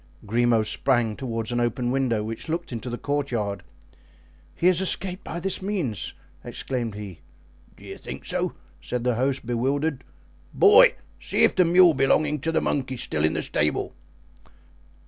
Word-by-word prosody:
Grimaud 115 +1 +2
sprang 115 0 +1
toward 115 -3 -4
an 120 - 0
open 120 +1 0
window 125 -5 0
which 115 +7 -6
looked 170 0 -3
into 120 +1 -5
the 120 - -4
courtyard. 120 -10 -2 0.9
"He - - -3
has 180 0 +5
escaped 185 0 -1
by 170 - -5
this 190 +2 -1
means," 185 - -3 0.3
exclaimed 120 -5 -4
he. 100 -5 -8 0.6
"Do - - -17
you - - -9
think - - -8
so?" - - -2 0.3
said 125 -1 -3
the 125 0 +2
host, 130 +2 -1
bewildered; 135 +4 -1 0.5
"boy, 465 +5 +7 0.2
see - - 0
if - - +5
the 180 - +4
mule 175 0 +6
belonging 145 +2 +2
to 165 +5 -2
the - - +1
monk 130 -2 -1
is 130 -1 -3
still 75 - -2
in 80 - +3
the - - -2
stable." 75 0 -1
130 Hz, 165 wpm, -25 LUFS, 115-160 Hz, 0.9 s, boy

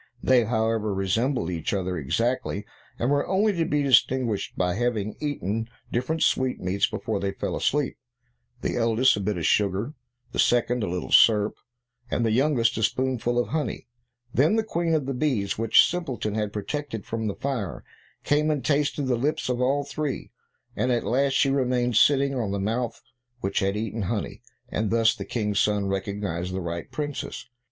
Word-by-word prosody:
They, 125 -3 +4
however, 110 -2 0
resembled 95 +1 0
each 85 +1 -2
other 95 -1 -2
exactly, 105 - -1 0.3
and 120 +4 0
were 145 0 +1
only 205 +3 +2
to 170 -3 0
be 150 -1 +1
distinguished 125 -4 +2
by 90 -1 +1
their 120 +6 -1
having 110 -4 -1
eaten 115 - -2 0.2
different 140 +7 0
sweetmeats 100 -7 +1
before 110 -3 -3
they 100 0 -2
fell - - -3
asleep; 145 -1 0 0.6
the - - -1
eldest 115 +2 +3
a - - -3
bit 100 -1 -1
of 85 - -2
sugar; 105 +6 +1 0.4
the - - -5
second 120 0 +3
a 100 - -1
little 90 +1 -4
syrup; 105 -2 +6 0.6
and 115 - 0
the 110 - +2
youngest 120 -2 +2
a - - -2
spoonful 120 +1 0
of 120 - +1
honey. 150 -7 -2 0.5
Then 150 - +4
the 225 - +2
Queen 170 -6 0
of 150 -4 0
the 135 - -2
bees, 125 -9 -1
which 115 -1 +6
Simpleton 135 -12 -3
had 105 -1 -1
protected 110 +2 -4
from 110 -1 -3
the 100 - -2
fire, 115 - -3 0.4
came 150 +1 +2
and 150 -3 -1
tasted 145 0 +1
the 130 -2 +1
lips 140 +2 -1
of 125 0 0
all 140 +3 +2
three, 140 0 -4 0.4
and 125 - 0
at 120 -1 +1
last 135 +3 +2
she 135 +1 +3
remained 125 -3 +1
sitting 140 +3 +4
on 120 -6 -1
the 100 0 -2
mouth 115 +4 -2 0.4
which 95 +1 0
had 100 +1 0
eaten 110 +1 -3
honey, 100 +2 -3 0.3
and 110 -1 -1
thus 115 0 +4
the - - -7
King's 105 -4 -1
son 105 -1 +2
recognized 95 -2 -3
the - - -1
right 85 -1 -5
princess. 145 -2 -4
115 Hz, 180 wpm, -25 LUFS, 105-135 Hz, 0.6 s, syrup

